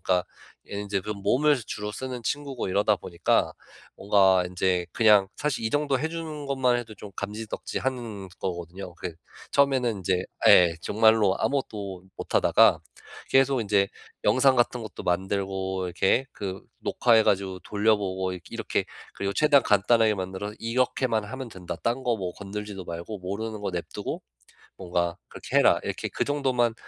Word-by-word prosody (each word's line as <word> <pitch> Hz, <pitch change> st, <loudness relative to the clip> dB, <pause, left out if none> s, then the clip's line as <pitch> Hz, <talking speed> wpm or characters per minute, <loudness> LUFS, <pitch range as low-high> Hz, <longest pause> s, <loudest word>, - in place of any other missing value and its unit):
그러니까 90 Hz, -1 st, +1 dB, 0.4 s
얘는 100 Hz, 0 st, -4 dB
이제 100 Hz, -1 st, -1 dB
그 105 Hz, +3 st, -6 dB
몸을 125 Hz, +8 st, +2 dB
주로 105 Hz, 0 st, -5 dB
쓰는 125 Hz, 0 st, -5 dB
친구고 140 Hz, -4 st, -3 dB
이러다 105 Hz, +2 st, +2 dB
보니까 85 Hz, 0 st, 0 dB, 0.4 s
뭔가 95 Hz, -2 st, +4 dB
인제 90 Hz, -1 st, 0 dB
그냥 105 Hz, -4 st, +5 dB
사실 140 Hz, -6 st, -2 dB
이 110 Hz, -, -2 dB
정도 145 Hz, -2 st, +1 dB
해주는 160 Hz, -1 st, -4 dB
것만 130 Hz, -3 st, +2 dB
해도 115 Hz, -3 st, -6 dB
좀 100 Hz, 0 st, -10 dB
감지덕지하는 110 Hz, 0 st, -4 dB
거거든요. 90 Hz, 0 st, -5 dB
그 85 Hz, -1 st, -6 dB, 0.4 s
처음에는 130 Hz, -7 st, +2 dB
이제 90 Hz, 0 st, 0 dB, 0.3 s
예. 85 Hz, -2 st, +7 dB
정말로 110 Hz, -2 st, +3 dB
아무것도 100 Hz, -9 st, -2 dB
못하다가 -, -, +4 dB, 0.5 s
계속 135 Hz, -1 st, +3 dB
인제 100 Hz, -2 st, +2 dB, 0.4 s
영상 130 Hz, +5 st, +4 dB
같은 120 Hz, 0 st, +2 dB
것도 110 Hz, -, -8 dB
만들고 95 Hz, +1 st, -1 dB
이렇게 95 Hz, +8 st, +2 dB
그 95 Hz, -2 st, -5 dB, 0.2 s
녹화해 115 Hz, -2 st, +3 dB
가지고 95 Hz, -2 st, 0 dB
돌려보고 100 Hz, -3 st, 0 dB
이 90 Hz, -, -8 dB
이렇게 -, -, -2 dB, 0.3 s
그리고 100 Hz, 0 st, -2 dB
최대한 150 Hz, -2 st, +5 dB
간단하게 110 Hz, +2 st, +3 dB
만들어서 95 Hz, +2 st, -5 dB
"이렇게만 115 Hz, -2 st, +1 dB
하면 130 Hz, +3 st, -6 dB
된다. 90 Hz, -3 st, -7 dB
딴 120 Hz, +3 st, 0 dB
거 120 Hz, -2 st, +1 dB
뭐 90 Hz, -4 st, -4 dB
건드리지도 100 Hz, -1 st, -7 dB
말고 85 Hz, +5 st, -6 dB
모르는 105 Hz, +4 st, -5 dB
거 100 Hz, -, -2 dB
내버려 85 Hz, -1 st, -2 dB
두고 -, -, -5 dB, 0.6 s
뭔가 85 Hz, -2 st, -1 dB
그렇게 -, -, -3 dB
해라." -, -, +5 dB
이렇게 -, -, -3 dB
그 -, -, -1 dB
정도만 130 Hz, -5 st, +1 dB
105 Hz, 355 characters per minute, -26 LUFS, 95-125 Hz, 0.6 s, 예